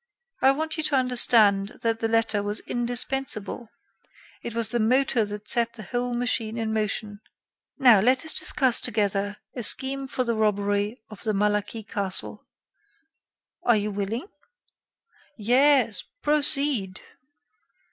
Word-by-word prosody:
I 265 Hz, -, +5 dB
want 315 Hz, +4 st, -1 dB
you 315 Hz, -, -2 dB
to 300 Hz, -, +1 dB
understand 225 Hz, -6 st, +3 dB
that 225 Hz, -1 st, -1 dB
the 225 Hz, -, -1 dB
letter 225 Hz, -2 st, 0 dB
was 205 Hz, +1 st, 0 dB
indispensable; 240 Hz, -2 st, -2 dB, 0.7 s
it 235 Hz, -, -7 dB
was 230 Hz, -2 st, 0 dB
the 240 Hz, +1 st, -2 dB
motor 245 Hz, 0 st, +2 dB
that 210 Hz, 0 st, -8 dB
set 235 Hz, -2 st, +1 dB
the 225 Hz, -2 st, -11 dB
whole 245 Hz, +5 st, -3 dB
machine 235 Hz, -2 st, -2 dB
in 220 Hz, -1 st, -3 dB
motion. 210 Hz, -1 st, -3 dB, 0.6 s
Now, 245 Hz, -7 st, +6 dB
let 255 Hz, +8 st, +1 dB
us 315 Hz, -, -3 dB
discuss 260 Hz, -4 st, +2 dB
together 205 Hz, 0 st, -1 dB, 0.2 s
a 245 Hz, -, -4 dB
scheme 270 Hz, +4 st, +4 dB
for 255 Hz, -, -2 dB
the 235 Hz, -1 st, -1 dB
robbery 205 Hz, +1 st, -1 dB
of 215 Hz, -, -11 dB
the 220 Hz, -2 st, -1 dB
Malaquis 210 Hz, +2 st, -2 dB
castle. 195 Hz, -3 st, -5 dB, 1.2 s
Are 240 Hz, -2 st, +3 dB
you 210 Hz, 0 st, -3 dB
willing?" 205 Hz, -, -4 dB, 1.1 s
"Yes, 245 Hz, +1 st, +2 dB, 0.2 s
proceed." 280 Hz, -9 st, +1 dB
230 Hz, 135 wpm, -24 LUFS, 210-255 Hz, 1.2 s, Now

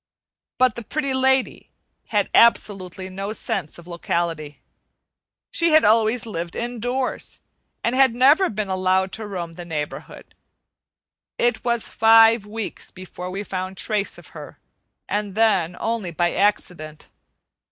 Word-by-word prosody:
But 255 Hz, -2 st, +3 dB
the 235 Hz, -, -7 dB
Pretty 275 Hz, +3 st, -2 dB
Lady 265 Hz, 0 st, +1 dB, 0.4 s
had -, -, 0 dB
absolutely 190 Hz, -5 st, +2 dB
no 195 Hz, +3 st, -5 dB
sense 195 Hz, -8 st, -4 dB
of 170 Hz, -, -13 dB
locality. 170 Hz, -4 st, -3 dB, 0.9 s
She 335 Hz, -2 st, +2 dB
had 315 Hz, -, +6 dB
always 225 Hz, +2 st, +3 dB
lived 170 Hz, -5 st, -5 dB
indoors 245 Hz, +2 st, -3 dB, 0.4 s
and 235 Hz, -, 0 dB
had 260 Hz, -2 st, +4 dB
never 285 Hz, +10 st, +5 dB
been 215 Hz, -1 st, -3 dB
allowed 190 Hz, 0 st, +1 dB
to 220 Hz, +1 st, -6 dB
roam 175 Hz, -4 st, -5 dB
the 175 Hz, -, -8 dB
neighborhood. 155 Hz, -3 st, -6 dB, 1.0 s
It 240 Hz, 0 st, 0 dB
was 235 Hz, -2 st, 0 dB
five 225 Hz, -1 st, +5 dB
weeks 220 Hz, 0 st, -6 dB
before 180 Hz, -1 st, -9 dB
we 195 Hz, +2 st, -4 dB
found 185 Hz, -1 st, -5 dB
trace 205 Hz, +1 st, -2 dB
of -, -, -15 dB
her, -, -, -10 dB, 0.5 s
and 205 Hz, -1 st, -3 dB
then 190 Hz, -6 st, +2 dB
only 225 Hz, -5 st, -2 dB
by 175 Hz, +1 st, 0 dB
accident. 175 Hz, -6 st, -1 dB
205 Hz, 130 wpm, -22 LUFS, 180-235 Hz, 1.0 s, had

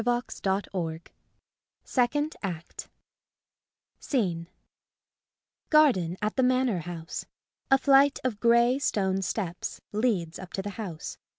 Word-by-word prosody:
] 225 Hz, -, -7 dB
ACT 245 Hz, +1 st, -1 dB
DROP 185 Hz, -4 st, -2 dB, 0.7 s
SECOND 290 Hz, +5 st, 0 dB
ACT 170 Hz, -5 st, -6 dB, 1.1 s
SCENE 175 Hz, -, -1 dB, 1.2 s
Garden 235 Hz, -, +4 dB
at 215 Hz, -, 0 dB
the 260 Hz, -, +2 dB
Manor 255 Hz, -5 st, +2 dB
House. 165 Hz, 0 st, -6 dB, 0.4 s
A 270 Hz, -, +6 dB
flight 275 Hz, +1 st, +5 dB
of 240 Hz, -5 st, -1 dB
grey 235 Hz, +3 st, +4 dB
stone 195 Hz, -8 st, 0 dB
steps 185 Hz, -2 st, -3 dB
leads 205 Hz, -7 st, 0 dB
up 185 Hz, -1 st, -10 dB
to 195 Hz, -, -3 dB
the 205 Hz, -, -4 dB
house. 185 Hz, -7 st, -6 dB
210 Hz, 115 wpm, -28 LUFS, 175-255 Hz, 1.2 s, A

